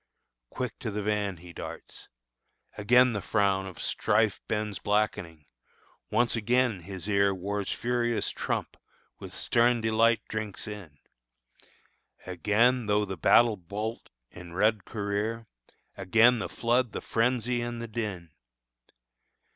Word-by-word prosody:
Quick 125 -2 -5
to 115 - -4
the 105 0 -3
van 105 -3 -1
he 85 +1 -13
darts. - - -9 0.7
Again 125 +4 +4
the 105 - -2
frown 100 -2 +1
Of 95 - -10
strife 105 -1 +1
bends 105 -2 -2
blackening; 90 -7 -1 0.6
once 120 -1 +2
again 120 -1 +1
his 95 +2 -8
ear 100 -1 +2
War's 100 +2 -3
furious 120 -1 0
trump - - -3 0.4
with - - -9
stern 120 0 +2
delight 115 +1 +3
drinks 110 -2 -5
in; 100 -9 -9 1.3
Again 105 +7 +2
tho 105 0 +2
Battle 115 +5 +4
Bolt 105 +6 -5 0.2
in 90 -1 -11
red 105 +1 +2
career! 105 +2 -3 0.5
Again 115 +5 +4
the - - -4
flood, 120 0 0
the - - -4
frenzy, 120 +1 0
and 120 0 -4
the 115 - -5
din! 105 -7 -5
105 Hz, 125 wpm, -28 LUFS, 100-115 Hz, 1.3 s, Again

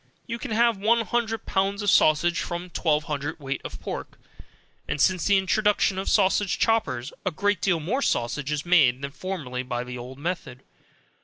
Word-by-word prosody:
You 235 -1 -5
can - - -6
have 230 0 +3
one 230 +3 +3
hundred 225 -1 -2
pounds 195 +2 0
of 205 - +3
sausage 170 +3 +4
from 175 +1 -5
twelve 155 -3 +1
hundred 145 0 -4
weight 135 -1 -4
of - - -7
pork, - - -6 0.7
and - - -2
since 185 +2 +2
the 200 -1 +4
introduction 195 0 +2
of 190 - -2
sausage 195 -1 +2
choppers, 145 - 0
a 185 - +1
great 200 +2 0
deal 180 -4 +2
more 210 - -1
sausage 135 - -1
is 150 +1 -2
made, 140 -7 +4
than 140 - -4
formerly, 145 -8 -5
by 125 -1 -3
the 125 0 -7
old 125 +2 -9
method. 145 -5 -5
175 Hz, 180 wpm, -25 LUFS, 140-205 Hz, 0.7 s, sausage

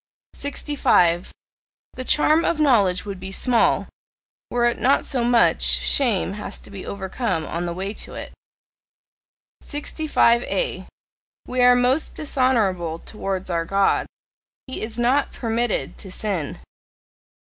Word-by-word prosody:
65. 190 - +1 0.6
The 255 - -5
charm 310 +4 +3
of 335 - 0
knowledge 210 -12 +3
would 200 -2 -6
be 190 +1 -7
small, 235 +3 +2 0.6
were 240 0 +1
it 240 - +1
not 270 +3 +3
so 255 -4 -1
much 240 -1 +3
shame 225 -8 +2
has 210 - -6
to - - -14
be 195 -2 -8
overcome 190 -3 -3
on 175 +1 -3
the 170 - -3
way 195 +3 -4
to - - -7
it. - - -8 1.3
65A. 295 - 0 0.6
We 250 0 -1
are 245 0 +7
most 250 +5 +1
dishonourable 215 - 0
towards 190 -1 -4
our 170 -1 0
God: 195 +3 +1 0.6
he 260 - -6
is 220 +1 -4
not 255 +4 +1
PERMITTED 230 - -2
to 190 - -10
sin. 185 -7 -3
230 Hz, 125 wpm, -22 LUFS, 190-255 Hz, 1.3 s, are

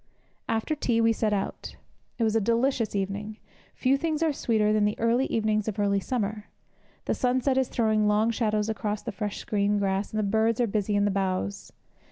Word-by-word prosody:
After 225 +7 0
tea 245 -6 0
we 225 0 +4
set 220 -1 0
out. 195 -1 -3 0.4
It 235 - 0
was 220 0 +1
a 225 - +3
delicious 235 +1 +1
evening. 200 +2 -3 0.4
Few 265 +1 +2
things 320 +1 -1
are 315 -2 +2
sweeter 215 -5 +1
than 215 -1 +2
the 210 0 0
early 235 +4 +2
evenings 215 -1 0
of 215 -1 -3
early 200 -1 +2
summer. 210 -1 -3 0.6
The - - 0
sunset 255 +1 +1
is 265 -1 +2
throwing 215 -2 +1
long 210 +2 +3
shadows 215 -2 0
across 210 -1 -3
the 235 - -4
fresh 205 0 -4
green 205 0 +1
grass, 195 0 -1
and 215 - -4
the 215 - +1
birds 220 +3 +1
are 240 - +3
busy 210 -1 -1
in 205 0 +3
the 205 - +1
boughs. 185 - -2
215 Hz, 200 wpm, -27 LUFS, 205-230 Hz, 0.6 s, we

